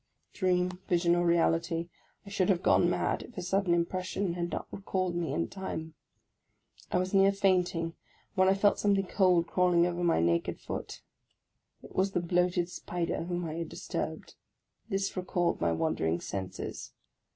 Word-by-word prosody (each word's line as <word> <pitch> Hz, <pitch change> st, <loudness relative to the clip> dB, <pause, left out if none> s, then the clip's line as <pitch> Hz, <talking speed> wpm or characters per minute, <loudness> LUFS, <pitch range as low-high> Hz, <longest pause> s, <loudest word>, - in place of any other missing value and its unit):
Dream, 180 Hz, -1 st, +1 dB
vision, 170 Hz, -1 st, +3 dB
or 175 Hz, -, +2 dB
reality, 170 Hz, 0 st, +2 dB, 0.4 s
I -, -, -9 dB
should 195 Hz, -2 st, +1 dB
have 185 Hz, -2 st, +2 dB
gone 175 Hz, -, +4 dB
mad 175 Hz, -, 0 dB
if 240 Hz, -, -13 dB
a -, -, -2 dB
sud 195 Hz, +3 st, +1 dB
den 170 Hz, -1 st, +3 dB
impression 185 Hz, +2 st, -1 dB
had 175 Hz, 0 st, -2 dB
not -, -, -4 dB
recalled 185 Hz, -2 st, -2 dB
me 175 Hz, -2 st, -1 dB
in 85 Hz, 0 st, 0 dB
time. 160 Hz, -4 st, -6 dB, 1.0 s
I -, -, +2 dB
was 185 Hz, +2 st, -1 dB
near 195 Hz, 0 st, +6 dB
fainting, 180 Hz, -4 st, +1 dB, 0.4 s
when 185 Hz, -2 st, +3 dB
I 190 Hz, -, +5 dB
felt 200 Hz, +1 st, +3 dB
something 200 Hz, -1 st, +2 dB
cold 180 Hz, -2 st, +3 dB
crawling 175 Hz, 0 st, +3 dB
over 175 Hz, 0 st, -2 dB
my 170 Hz, -, +3 dB
naked 85 Hz, 0 st, +1 dB
foot. -, -, -6 dB, 0.8 s
It -, -, -13 dB
was 195 Hz, +1 st, +1 dB
the -, -, +2 dB
bloated 175 Hz, 0 st, +1 dB
spider, 175 Hz, -2 st, -3 dB
whom 175 Hz, 0 st, -2 dB
I 155 Hz, -, -4 dB
had 170 Hz, -, -4 dB
disturbed. -, -, -5 dB, 0.6 s
This 195 Hz, -1 st, -1 dB
recalled 180 Hz, -1 st, 0 dB
my 85 Hz, 0 st, +2 dB
wandering 80 Hz, 0 st, 0 dB
senses. 95 Hz, 0 st, -6 dB
175 Hz, 165 wpm, -30 LUFS, 170-190 Hz, 1.0 s, near